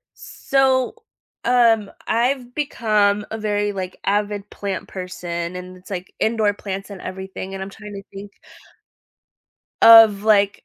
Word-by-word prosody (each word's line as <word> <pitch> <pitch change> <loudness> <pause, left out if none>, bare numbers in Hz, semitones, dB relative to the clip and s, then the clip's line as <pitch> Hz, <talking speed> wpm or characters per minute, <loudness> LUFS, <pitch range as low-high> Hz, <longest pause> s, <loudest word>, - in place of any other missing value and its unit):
So, 265 - 0 0.5
um, 230 -4 +3 0.2
I've 245 +2 0
become 215 -8 +1
a 220 - -4
very, 205 -1 -1
like, 185 -2 -5
avid 205 0 -1
plant 195 -3 -5
person, 175 -2 -5
and 180 0 -9
it's 180 +2 -17
like 185 -1 -6
indoor 220 -2 +2
plants 195 0 -6
and 195 -2 -9
everything, 190 0 -7
and 190 - -5
I'm 195 - -6
trying 210 0 -11
to 195 - -7
think 200 +1 -10 1.5
of 225 -3 +8
like 205 -2 +2
205 Hz, 135 wpm, -21 LUFS, 190-220 Hz, 1.5 s, of